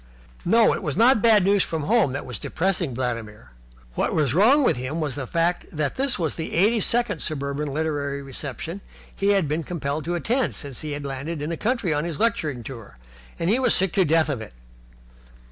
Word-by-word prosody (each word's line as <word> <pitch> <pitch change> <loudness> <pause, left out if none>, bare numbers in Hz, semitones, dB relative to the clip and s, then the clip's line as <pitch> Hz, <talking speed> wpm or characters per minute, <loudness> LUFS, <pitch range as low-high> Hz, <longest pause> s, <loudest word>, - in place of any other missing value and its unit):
It 225 +4 +4
was 150 +1 -2
not 235 0 +5
bad 220 -4 +5
news 200 +1 +3
from 160 -4 -2
home 215 - +3
that 145 - -4
was 125 -6 -6
depressing 170 -6 -1
Vladimir. 115 - -4 0.4
What - - -1
was 145 -6 +1
wrong 240 - +5
with - - +3
him 130 +6 -4
was 150 -4 -1
the 130 -1 -4
fact 170 +4 0
that 150 -3 -1
this 270 -1 0
was 165 -4 0
the 160 - -5
eighty 210 +7 +4
second 230 -5 +1
suburban 140 0 -3
literary 145 -2 -2
reception 145 +7 -5 0.3
he 195 - -1
had 195 -6 +2
been 155 +3 -1
compelled 155 -3 -3
to 175 +1 -1
attend 235 - 0
since 140 -4 -7
he 150 -1 -4
had 145 0 -5
landed 140 +4 -4
in 150 +3 -3
the - - -1
country 220 -5 0
on 150 0 0
his 165 -3 -4
lecturing 160 - 0
tour, 115 - -10 0.4
and 165 - -2
he 225 +7 +3
was 255 -2 +3
sick 190 -2 +1
to 195 - +4
death 160 -1 +2
of 135 -6 -2
it. 110 - -9
160 Hz, 205 wpm, -24 LUFS, 140-195 Hz, 0.4 s, not